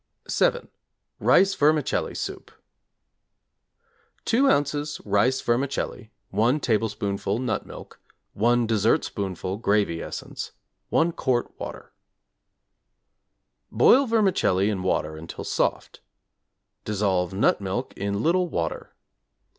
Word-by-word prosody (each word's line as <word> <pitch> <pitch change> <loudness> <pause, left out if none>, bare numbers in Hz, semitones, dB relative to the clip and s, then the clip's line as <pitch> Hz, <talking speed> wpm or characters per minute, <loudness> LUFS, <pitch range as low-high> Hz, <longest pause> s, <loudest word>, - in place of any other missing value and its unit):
=7. - - +1 0.5
Rice 195 +1 +4
Vermicelli 150 -1 +1
Soup= - - -5 1.8
2 250 +5 +3
ozs. 145 - +1
rice 105 +6 +2
vermicelli, 120 -2 -2 0.2
1 115 +9 +2
tablespoonful 105 -4 -1
nut 115 -4 -2
milk, - - -12 0.3
1 120 +3 +2
dessertspoonful 100 -3 0
gravy 100 -6 +1
essence, - - -7 0.4
1 165 +1 +2
quart 130 -6 -1
water. - - -8 1.8
Boil 270 +1 +5
vermicelli 185 - +2
in 95 -3 -3
water 80 -4 -1
until 80 +1 -8
soft. - - -1 0.8
Dissolve 95 -4 0
nut 100 - +2
milk 100 +7 -3
in 100 +1 -2
little 180 +2 +2
water. 85 - -4
115 Hz, 95 wpm, -25 LUFS, 100-145 Hz, 1.8 s, Boil